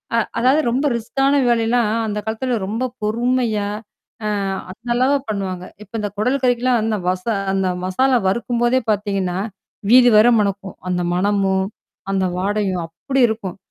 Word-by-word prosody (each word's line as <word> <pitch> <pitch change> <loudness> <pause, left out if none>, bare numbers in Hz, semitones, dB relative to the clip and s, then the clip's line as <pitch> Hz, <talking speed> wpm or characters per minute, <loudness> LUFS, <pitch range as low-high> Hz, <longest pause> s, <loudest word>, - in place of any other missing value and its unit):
அ - - +3 0.2
அதாவது 265 +6 +4
ரொம்ப 270 +4 0
ரிஸ்கான 270 +4 0
வேலைல்லாம், 230 -1 +2 0.2
அந்தக்காலத்திலே 220 +4 -2
ரொம்பப் 245 +4 -3
பொறுமையா 230 -1 0 0.6
அ - - 0 0.4
அந்த 235 +5 -15
அளவு 265 +3 +3
பண்ணுவாங்க. 185 -3 -3 0.2
இப்போ 210 - -22
இந்தக் 205 -1 -4
குடல் 255 +5 +1
கறிக்கெல்லாம் 245 -1 +2 0.7
அந்த 195 -1 +1 0.2
மசாலா 255 +7 +2
வறுக்கும்பொதே 240 +4 +1
பார்த்தீங்கனா, 195 -3 -1 0.5
வீதி 245 -1 +8
வரை 235 +3 +6
மணக்கும். 200 -1 -2
அந்த 180 -1 0
மணமும், 195 0 +1 0.4
அந்த 190 -1 +1
வாசனையும் 195 -2 0
அப்டி 255 +11 -2
இருக்கும். 205 -4 -4
220 Hz, 125 wpm, -20 LUFS, 195-245 Hz, 0.7 s, வீதி